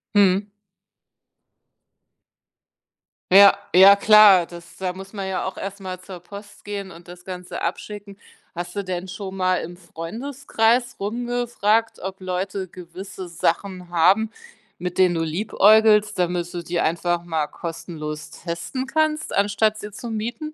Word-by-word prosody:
Mhm. 200 0 +4 2.8
Ja, 200 +1 +8 0.2
ja 195 +2 +9
klar, 205 -3 +7
das 170 0 -13
da 185 -1 -3
muss 190 +2 -11
man 195 -2 -4
ja 190 -1 -2
auch 190 - -5
erst 195 +1 -6
mal 185 -2 -6
zur 185 -1 -10
Post 200 +4 -12
gehen 200 -2 -5
und 170 0 -14
das 180 0 -12
Ganze 180 -1 -7
abschicken. 205 -1 -5 0.3
Hast 175 +1 -6
du 200 - -2
denn 185 -1 -4
schon 190 +1 -7
mal 185 -1 +1
im 175 +1 -8
Freundeskreis 235 - -1
rumgefragt, 230 0 0
ob 190 +1 -7
Leute 185 +1 -3
gewisse 185 +2 -9
Sachen 180 +2 -2
haben, 185 +6 +3 0.5
mit 180 0 -5
denen 180 -2 +4
du 165 - 0
liebäugelst, 210 +4 +4
damit 175 -1 -1
du 175 - -4
die 170 +1 -2
einfach 170 +1 0
mal 160 -3 -1
kostenlos 155 -2 -7
testen 175 +10 -5
kannst, 310 +2 0
anstatt 205 +2 +1
sie 210 - -8
zu 235 +4 -8
mieten? 240 +8 -4
190 Hz, 140 wpm, -22 LUFS, 175-210 Hz, 2.8 s, ja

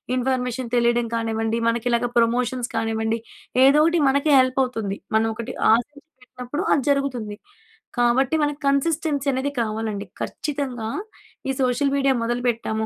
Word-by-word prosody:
Information 255 -1 -1
తెలియడం 235 0 +2
కానివ్వండి, 225 0 -1
మనకి 230 +1 0
ఇలాగా 235 0 +1
ప్రమోషన్స్ 240 +1 +1
కానివ్వండి, 225 0 0 0.5
ఏదో 275 +3 +6
ఒకటి 335 0 +2
మనకి 280 +3 +1
హెల్ప్ 255 +1 +2
అవుతుంది. 225 -6 -3 0.2
మనం 220 +1 +3
ఒకటి 235 +3 -6 0.2
ఆశించి 285 +6 -2
పెట్టినప్పుడు 255 +5 -6
అది 275 - +1
జరుగుతుంది. 255 -7 -1 0.6
కాబట్టి 245 +5 +2
మనకు 290 0 -1
కన్సిస్టెన్సీ 285 0 0
అనేది 265 +2 -1
కావాలండి. 215 -2 -3 0.2
ఖచ్చితంగా, 270 -7 -4 0.6
ఈ - - +3
సోషల్ 255 +2 +1
మీడియా 275 -1 +3
మొదలు 240 +1 -1
పెట్టాము, 220 -1 -2
245 Hz, 135 wpm, -23 LUFS, 230-275 Hz, 0.6 s, ఏదో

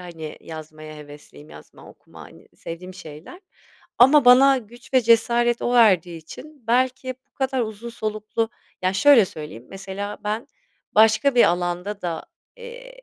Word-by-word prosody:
hani, 165 -4 -9
yazmaya 155 -1 -10
hevesliyim, 145 0 -14
yazma, - - -15
okuma, - - -18
hani, - - -17
sevdiğim 180 +2 -9
şeyler 160 - -12 0.6
ama 275 +4 +6
bana 265 +2 +6
güç 240 +3 -15
ve 255 - +6
cesaret 235 +1 +2
o 245 - -1
verdiği 185 -8 +3
için 275 - -14
belki 255 +2 0 0.2
bu - - -72
kadar 265 -1 -1
uzun 220 +1 -7
soluklu 215 0 -3 0.3
Ya, 185 - +1
şöyle 245 +3 +6
söyleyeyim: 150 -9 -10
Mesela 195 +1 -7
ben 215 +3 -3 0.5
başka 220 +5 +4
bir 240 - +6
alanda 175 +3 -2
da, 170 -2 -4 0.3
eee, - - -12
215 Hz, 145 wpm, -22 LUFS, 175-250 Hz, 0.6 s, ama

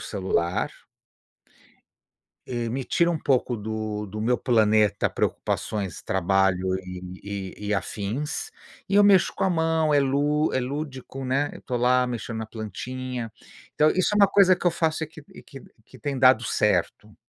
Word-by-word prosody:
celular 95 -3 -1 1.8
eh, 120 -2 -3
me 130 +3 -3
tira 170 +6 +2
um 160 - -2
pouco 125 -3 +1
do 110 -1 -4
do 105 +2 -7
meu 120 +3 +2
planeta 110 -4 +3
preocupações, 100 -5 -2
trabalho 95 0 +1
e 90 +2 -7
e 105 - -6
e 105 - 0
afins. 110 - -3 0.4
E 200 - +1
eu 205 - +7
mexo 200 -3 +5
com - - -1
a 190 - +3
mão, 160 -2 +1
é 145 - +5
lú 145 +3 +1
é - - +1
lúdico, 135 0 -5
né, 135 +3 0
eu - - -11
tô 125 - -3
lá 125 +1 +3
mexendo 120 -2 -5
na 110 - -4
plantinha. 120 +2 -6 0.4
Então, 155 +1 +4
isso 185 - +1
é - - +1
uma 200 - +7
coisa 190 -2 +5
que 180 - -9
eu 175 - +5
faço 160 -1 0
e - - -5
que 155 0 -13
e - - -13
que 135 - -12 0.2
que - - -16
tem 140 -2 -3
dado 130 -2 +5
certo. 105 0 0
125 Hz, 170 wpm, -25 LUFS, 105-150 Hz, 1.8 s, eu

